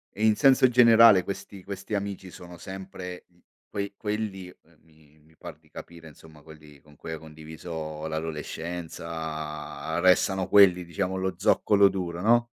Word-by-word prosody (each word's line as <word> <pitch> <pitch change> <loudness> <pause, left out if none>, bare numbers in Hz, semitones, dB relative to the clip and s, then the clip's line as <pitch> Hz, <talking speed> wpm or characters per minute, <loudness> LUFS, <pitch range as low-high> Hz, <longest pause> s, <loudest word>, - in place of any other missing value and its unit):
E 105 - -4
in 110 - +4
senso 130 +2 +5
generale 115 -5 +7
questi 100 0 -8
questi 100 +2 -6
amici 100 -2 -5
sono 90 -1 -12
sempre, 95 -1 -8
mhmm, 90 0 -30 0.3
quei 100 -1 -5
quelli, 105 -3 -4
ehm, 85 -2 -19
mi 80 -1 -25
mi 80 0 -25
par 85 -3 -10
di 80 -1 -30
capire 85 -1 -11
insomma, 80 0 -16
quelli 75 -2 -15
con 75 -1 -21
cui 80 - -8
hai 80 - -5
condiviso 80 0 -8
l'adolescenza. 80 0 -5
Restano 95 0 +3
quelli 90 -3 +5
diciamo 95 +2 -3
lo 95 0 -2
zoccolo 100 -1 +3
duro, 90 -2 -4
no? 120 +2 +3
90 Hz, 150 wpm, -26 LUFS, 80-100 Hz, 0.3 s, generale